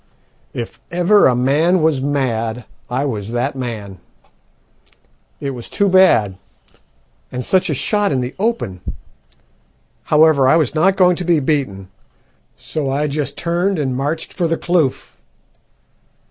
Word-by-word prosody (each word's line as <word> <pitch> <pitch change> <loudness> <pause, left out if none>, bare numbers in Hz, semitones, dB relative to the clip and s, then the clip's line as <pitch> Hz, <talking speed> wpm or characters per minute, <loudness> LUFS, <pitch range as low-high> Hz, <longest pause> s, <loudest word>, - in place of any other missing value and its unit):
"If 120 -2 -6
ever 180 +4 +4
a 125 - +2
man 155 +8 +2
was 155 -4 +2
mad 120 -5 -2 0.2
I 130 +3 -1
was 110 -4 -4
that 130 +4 -1
man. 110 -7 -6 1.4
It 140 - -3
was 120 -3 -8
too 200 - +1
bad; 145 - +4 0.9
and 125 0 -4
such 185 -1 +1
a 150 - 0
shot 205 - 0
in 135 - 0
the 125 0 -4
open! 200 - -2 1.2
However, 150 -3 +4
I - - +5
was 155 -6 +1
not 185 +5 +3
going 180 -2 +4
to 180 - -3
be 170 -2 +2
beaten, 130 -10 -2 0.7
so 150 -3 -4
I 140 +3 0
just 150 0 -3
turned 175 +3 0
and 135 -4 -1
marched 145 +5 -3
for 175 -3 -1
the 165 0 -1
kloof. 170 -7 -1
145 Hz, 140 wpm, -18 LUFS, 125-170 Hz, 1.4 s, I